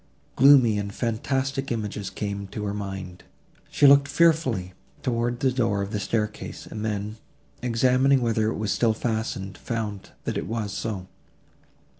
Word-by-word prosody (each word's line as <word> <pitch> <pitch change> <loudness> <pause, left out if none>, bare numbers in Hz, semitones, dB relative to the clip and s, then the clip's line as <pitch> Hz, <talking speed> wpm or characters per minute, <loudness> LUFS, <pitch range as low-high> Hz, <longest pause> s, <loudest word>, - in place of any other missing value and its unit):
Gloomy 130 -6 +6
and 100 0 -4
fantastic 135 +5 -2
images 105 -3 -3
came 100 -1 -4
to 105 +2 -5
her 100 - -2
mind. 95 -3 -6 0.5
She - - +3
looked 140 0 +7
fearfully 140 - +2 0.3
towards 120 -1 0
the 130 - +3
door 115 -6 +1
of 100 - -6
the 105 - -1
staircase, 105 +1 -3
and 110 -1 -6
then, 105 0 -3 0.4
examining 125 +3 +3
whether 115 -3 +1
it 110 - -1
was 105 -1 -1
still 115 -2 +2
fastened, 110 -4 -3
found 110 -4 -4
that - - -2
it - - -5
was 110 -3 -3
so. 100 -5 -4
110 Hz, 150 wpm, -25 LUFS, 100-125 Hz, 0.5 s, looked